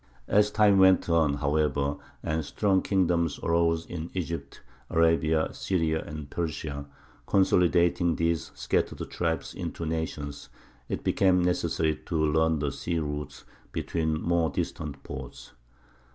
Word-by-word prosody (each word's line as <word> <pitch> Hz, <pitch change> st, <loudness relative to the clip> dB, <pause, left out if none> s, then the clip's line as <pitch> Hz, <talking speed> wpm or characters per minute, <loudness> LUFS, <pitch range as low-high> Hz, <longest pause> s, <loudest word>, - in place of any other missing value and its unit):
As 105 Hz, 0 st, +4 dB
time 105 Hz, -2 st, +4 dB
went 95 Hz, -1 st, +5 dB
on, 80 Hz, -4 st, +3 dB
however, 70 Hz, -1 st, 0 dB, 0.3 s
and 80 Hz, 0 st, -1 dB
strong 95 Hz, +5 st, +1 dB
kingdoms 85 Hz, -5 st, +1 dB
arose 85 Hz, 0 st, +2 dB
in 85 Hz, -1 st, -6 dB
Egypt, 85 Hz, -6 st, -4 dB, 0.3 s
Arabia, 80 Hz, -1 st, +2 dB
Syria, 80 Hz, -4 st, 0 dB
and 75 Hz, -1 st, -7 dB
Persia, 75 Hz, -3 st, -4 dB, 0.4 s
consolidating 85 Hz, -2 st, +3 dB
these 85 Hz, 0 st, 0 dB
scattered -, -, -1 dB
tribes 80 Hz, -2 st, -2 dB
into 85 Hz, -, -5 dB
nations, 80 Hz, -3 st, -4 dB, 0.4 s
it -, -, -3 dB
became 90 Hz, -2 st, +3 dB
necessary 80 Hz, -3 st, +1 dB
to 85 Hz, -, -3 dB
learn 80 Hz, +1 st, +2 dB
the 70 Hz, -1 st, -1 dB
sea 85 Hz, +5 st, -3 dB
routes 75 Hz, -1 st, -4 dB, 0.3 s
between 80 Hz, -2 st, -1 dB
more 85 Hz, -1 st, +1 dB
distant 70 Hz, -3 st, -4 dB
ports. -, -, -8 dB
80 Hz, 125 wpm, -27 LUFS, 75-85 Hz, 0.4 s, went